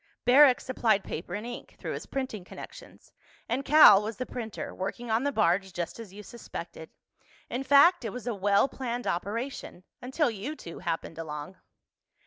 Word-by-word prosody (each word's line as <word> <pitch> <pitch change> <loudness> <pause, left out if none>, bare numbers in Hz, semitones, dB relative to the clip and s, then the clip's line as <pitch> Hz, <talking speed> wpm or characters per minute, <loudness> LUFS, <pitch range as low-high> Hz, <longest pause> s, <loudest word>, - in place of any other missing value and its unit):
Barrack 260 0 +7
supplied 225 -5 +1
paper 175 +3 -6
and 210 +2 -5
ink, 240 0 -8
through - - -5
his - - -7
printing 260 -8 -4
connections. - - -12 0.3
And 250 +4 -1
Cal 285 -9 +8
was 215 +1 -5
the 255 - -3
printer, 225 -4 -6
working 220 +5 -5
on 225 +3 +2
the 285 - +1
barge, 190 -5 +1
just 175 +5 -5
as 220 -5 -9
you 210 +2 -11
suspected. 235 +3 -9 0.6
In 250 - -2
fact, 285 +5 +5
it 225 - -3
was 245 +2 -8
a 240 - -1
well 200 +3 +2
planned 245 -3 -5
operation—until 240 - -3
you 225 +9 -5
two 170 - -10
happened 165 0 -4
along." 150 +2 -7
225 Hz, 165 wpm, -28 LUFS, 195-255 Hz, 0.6 s, Cal